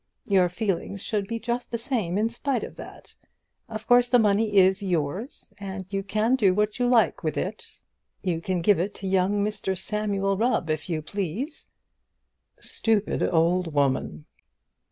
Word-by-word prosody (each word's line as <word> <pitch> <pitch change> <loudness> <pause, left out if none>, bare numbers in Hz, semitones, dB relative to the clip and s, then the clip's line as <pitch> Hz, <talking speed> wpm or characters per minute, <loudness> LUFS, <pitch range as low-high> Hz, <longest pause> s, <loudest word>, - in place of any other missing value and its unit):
Your 185 -3 +3
feelings 195 0 -2
should 205 -3 -1
be 230 - -3
just 235 +2 -3
the 235 - -2
same 220 -7 -1
in 215 +2 +2
spite 240 +2 -2
of - - -7
that. - - -11 0.5
Of 220 -1 -6
course 245 0 +5
the 245 - +6
money 210 -1 +2
is 190 +1 +5
yours 185 - -3
and 190 -1 -6
you 195 - 0
can 215 +5 +1
do 195 -7 +3
what 210 +3 0
you 245 - +2
like 240 -3 +3
with 155 - -1
it. 205 +4 -5 0.4
You 175 -4 -1
can 180 0 -1
give 205 -1 +4
it 195 +4 -2
to 195 - -5
young 195 +2 +2
Mr 200 -3 -2
Samuel 195 0 -1
Rubb, 225 -7 +1
if 155 +2 -3
you 155 -3 -2
please." 205 - -4 0.9
Stupid 220 -2 0
old 170 -1 +1
woman! 130 - 0
200 Hz, 165 wpm, -26 LUFS, 180-220 Hz, 0.9 s, the